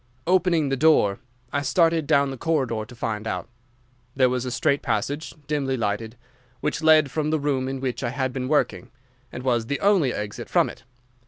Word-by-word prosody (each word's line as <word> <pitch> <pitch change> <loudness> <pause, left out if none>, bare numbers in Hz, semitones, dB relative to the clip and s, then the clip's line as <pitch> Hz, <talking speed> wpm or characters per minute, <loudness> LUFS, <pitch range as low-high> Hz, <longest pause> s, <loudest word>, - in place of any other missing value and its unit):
Opening 175 -4 +2
the 135 - +1
door, 135 -9 +3 0.3
I 145 - +1
started 165 0 +2
down 140 0 +3
the - - -5
corridor 130 -9 -1
to 120 - -13
find 110 -2 -3
out. - - -3 0.7
There 130 -1 +4
was 125 0 -2
a - - -2
straight 140 +2 +1
passage, 145 +9 -2
dimly 135 -3 -1
lighted, 110 +1 -2 0.4
which 150 +2 -2
led 155 -3 +5
from 155 +1 -1
the 155 0 +1
room 140 -3 0
in 135 0 -4
which 130 -2 -3
I 120 - -1
had 130 0 -2
been 130 -1 -3
working, 145 -4 0 0.4
and 125 - -7
was 120 -3 +1
the 140 - -2
only 195 -10 +3
exit 105 -2 -5
from - - +2
it. - - -17
135 Hz, 190 wpm, -24 LUFS, 125-155 Hz, 0.7 s, led